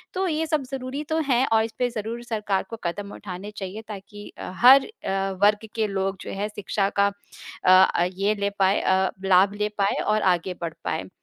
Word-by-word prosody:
तो 380 +1 0
ये 320 -1 0
सब 305 -2 0
ज़रूरी 265 +2 -4
तो 320 0 +1
है 255 -1 +3
और 220 0 +4
इसपे 230 +2 -2
ज़रूर 230 +1 -5
सरकार 210 -4 -1
को 230 - -6
कदम 200 +4 -4
उठाने 195 +1 -8
चाहिए, 195 +3 -6
ताकि 205 0 -9
अ, - - -6
हर 260 +5 +7
अ, 195 - -3
वर्ग 210 +1 +3
के 220 -2 +1
लोग 195 0 -2
जो - - -7
है 205 +2 -3
शिक्षा 205 -1 -1
का 200 - +5 0.6
अ - - +5 0.3
अ, - - +3
ये 200 +3 0
ले 200 0 -1
पाएँ 195 +1 +3
अ, 190 0 +2 0.2
लाभ 190 +1 +5
ले 210 - +1
पाएँ 200 -1 +1
और 215 0 +2
आगे 175 +1 -3
बढ़ 165 -1 -3
पाएँ। - - -3
205 Hz, 205 wpm, -24 LUFS, 195-235 Hz, 0.6 s, हर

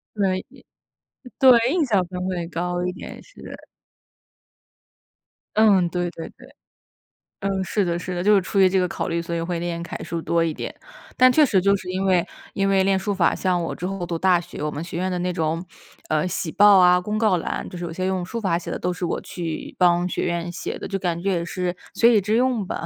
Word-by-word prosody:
对， 190 -2 0 0.9
对， 255 -3 +7
印 325 0 +1
象 200 -7 +1
分 180 0 -5
会 175 -3 -3
高 175 +1 -3
一 180 - -1
点， - - -9
是 - - -17
的。 - - -9 2.0
嗯， 200 -5 +4
对 175 0 -2
对 165 - -8
对。 - - -17 0.9
嗯， 195 -1 -1
是 200 +2 0
的 175 -1 -1
是 180 0 -5
的， 175 - -2
就 210 - +5
是 200 - +5
出 195 +2 -4
于 190 -1 +6
这 190 0 +2
个 180 - +1
考 - - -4
虑， 170 0 -1
所 170 0 -4
以 165 - -2
会 170 0 -3
练 170 -1 -3
楷 175 - -7
书 170 -1 -4
多 170 +1 +1
一 165 -2 0
点。 - - -6 0.4
但 255 0 +7
确 300 +3 +5
实 200 -7 +2
就 200 +2 +3
是 185 -2 -7
因 190 +1 -2
为 180 -2 +3 0.3
因 195 0 0
为 195 -1 +3
练 195 -1 +3
书 205 +2 -2
法， 180 -4 +2
像 180 -2 0
我 165 - -3
之 180 - -6
后 195 -2 -3
读 170 -1 -3
大 180 0 +3
学， 175 -3 -8
我 150 - -1
们 145 - -5
学 170 0 -7
院 185 +2 -1
的 180 - -2
那 180 0 -1
种， 165 +1 -2 0.4
嗯， 155 +1 +1
喜 180 -2 -3
报 205 -1 +7
啊， 180 -1 +5
公 210 +3 -3
告 215 -4 +3
栏， - - -4
就 180 - -8
是 175 - -6
有 170 - -4
些 185 +3 -3
用 185 -2 -1
书 230 +6 -5
法 185 -6 0
写 175 - -6
的 - - -4
都 180 0 -1
是 180 - -7
我 - - -2
去 165 -3 -6
帮 175 0 +3
学 - - -3
院 170 0 -2
写 175 - -5
的， - - -6
就 195 - -2
感 175 -3 -2
觉 195 +1 0
也 170 -1 -1
是 180 0 -3 0.2
学 235 0 +5
以 205 - +4
致 215 +4 +1
用 245 -5 +1
吧。 - - -5
180 Hz, 255 characters per minute, -23 LUFS, 175-195 Hz, 2.0 s, 对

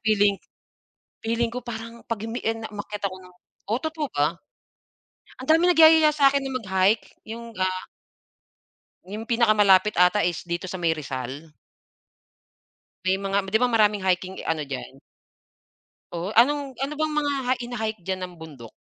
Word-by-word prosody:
feeling 205 -3 +2 0.8
feeling 230 +1 -1
ko 245 +1 -7
parang 230 0 -8
'pag 230 -3 -4
umini 235 +2 -5
a, 225 - +2
na 220 - -5
umakyat 205 0 -7
ako 185 - -9
ng 180 - -17 0.4
oh, 235 - +1
totoo 315 -2 -3
ba? 150 +4 +1 1.0
Andaming 325 +6 +4
nagyayaya 315 -2 +7
sa'kin 280 -2 +3
na 270 - -4
mag-hike, 200 -3 +1 0.2
'yung 230 0 -9
ga 185 - +1 1.4
'Yung 210 +5 -7
pinakamalapit 210 -4 +4
ata 180 +3 +4
is 175 0 -2
dito 175 +1 -4
sa 185 - -5
may 165 -2 +1
Rizal. 140 +1 -6 1.5
May 190 +1 +2
mga 195 0 -1
'di 220 - +3
ba, 250 - +3
maraming 210 -4 +2
hiking 185 0 -1
ano 160 -2 0
diyan? 65 - -7 1.2
Oh, 170 +2 -3
anong, 275 +2 +3
ano 275 +2 -3
bang 310 +1 -1
mga 290 -1 +1 0.2
hi 255 - +3
hina-hike 220 -3 -4
diyan 190 0 -3
nam 180 -1 -6
bundok? 150 -8 -11
215 Hz, 150 wpm, -24 LUFS, 185-245 Hz, 1.5 s, nagyayaya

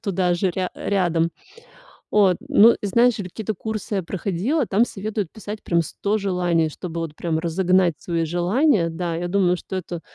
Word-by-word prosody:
туда 185 -4 +1
же 180 +2 0
ря 185 +1 -2
рядом. 170 -4 0 0.8
От 195 -4 +4
ну 230 +3 +6
и - - -3
знаешь, 235 +4 +3
я 205 - -4
какие-то 215 +4 -4
курсы 215 +1 -4
я 190 - -1
проходила, 200 - -1
там 210 +4 +3
советуют 210 -4 -4
писать 215 -1 -8
прям 170 -1 +2
100 200 +6 -2
желаний, 175 -5 +1
чтобы 170 +2 -6
вот 165 -2 -5
прям 160 -1 -1
разогнать 180 +1 +2
свои 165 -2 -2
желания. 175 - +2
Да, 165 0 -3
я 175 +2 -3
думаю, 180 -1 +2
что 190 - -7
это 175 -2 -6
185 Hz, 175 wpm, -22 LUFS, 170-205 Hz, 0.8 s, ну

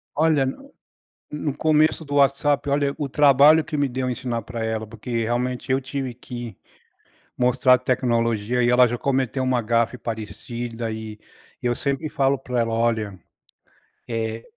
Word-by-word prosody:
Olha, 155 -2 +3
n 275 - -6 0.6
no 150 -1 -3
começo 155 +1 +2
do 145 -1 -3
WhatsApp, 140 +1 +2
olha, 140 0 +1
o 145 - -2
trabalho 145 +3 +6
que 150 - -4
me 140 -1 +2
deu 130 0 -2
ensinar 120 -1 -3
pra 115 +1 -6
ela, 110 0 -2
porque, 115 +3 -10
realmente, 125 +3 -2
eu 135 - +2
tive 135 -1 -4
que 120 -3 -8 0.8
mostrar 125 +1 +4
a - - 0
tecnologia. 120 -2 0
E 120 - +3
ela 125 +1 +6
já 120 0 -2
cometeu 130 -1 0
uma 130 -1 +1
gafe 115 +2 0
parecida. 115 +1 -5
E 110 -1 -7 0.4
eu 120 0 +1
sempre 140 +4 -2
falo 135 0 +1
pra 125 -2 -3
ela: 115 -1 0
"Olha, 110 -3 0 0.9
eh, 115 0 -3
125 Hz, 155 wpm, -23 LUFS, 115-140 Hz, 0.9 s, trabalho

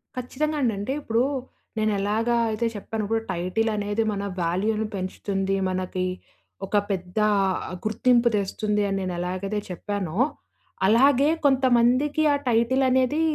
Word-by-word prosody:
ఖచ్చితంగా 295 +5 -2
అండి. 235 -4 +2
అంటే 220 +7 -2
ఇప్పుడు 230 0 +1 0.5
నేనెలాగా 215 +2 +1 0.2
అయితే 230 +2 0
చెప్పాను. 215 +1 -4
ఇప్పుడు 225 +1 0
టైటిల్ 185 +6 -1
అనేది 205 +2 0
మన 200 0 -3 0.2
వాల్యూను 210 +6 0
పెంచుతుంది. 195 +1 -2
మనకి 185 0 -2 0.6
ఒక 205 +2 0
పెద్ద 180 +1 -4 0.7
గుర్తింపు 235 +2 +3
తెస్తుంది 210 +1 0
అని 195 - -1
నేనెలాగైతే 185 +3 -3
చెప్పానో 185 -1 -4 0.7
అలాగే 270 +6 +5 0.2
కొంతమందికి 265 +3 +3
ఆ - - +3
టైటిల్ 240 +3 +2
అనేది 260 +4 +2
215 Hz, 115 wpm, -25 LUFS, 195-245 Hz, 0.7 s, అలాగే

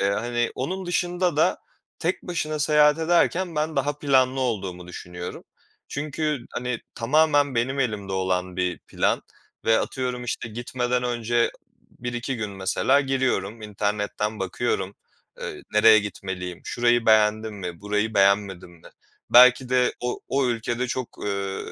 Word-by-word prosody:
Eee, 100 0 +2
hani, 120 +3 -1
onun 185 +8 -3
dışında 175 -2 0
da 155 - +3 0.4
tek 175 +3 -1
başına 155 -4 -3
seyahat 150 0 +4
ederken 170 +1 +2
ben 155 +1 -1
daha 145 +2 0
planlı 130 -2 +2
olduğumu 95 -8 -3
düşünüyorum. 90 0 -8 0.4
Çünkü, 150 +1 -2
hani, 125 -1 -3
tamamen 145 +2 +3
benim 130 +4 0
elimde 105 -6 -2
olan 95 -1 -1
bir 90 -2 -1
plan - - -1 0.4
ve 115 0 +4
atıyorum 125 -1 -3
işte 120 -1 -3
gitmeden 125 +2 -2
önce 120 -1 +1 0.3
b - - -23
1-2 120 +1 -3
gün 105 -2 -4
mesela 95 +8 +2
giriyorum. 125 -6 -1
İnternetten 105 +1 -2
bakıyorum. 95 0 -2 0.5
Eee, - - -6
nereye 110 +1 +7
gitmeliyim? 95 -3 -5
Şurayı 120 -1 +1
beğendim 110 0 +3
mi? 90 -4 -6
Burayı 105 +2 -1
beğenmedim 100 -2 +2
mi? 85 -2 -16 0.4
Belki 125 +1 +7
de 125 0 +3
o 125 0 -3
o 135 -1 +1
ülkede 120 +1 -1
çok, 130 -1 -3 0.2
eee, 100 -1 -2
120 Hz, 140 wpm, -24 LUFS, 100-135 Hz, 0.5 s, nereye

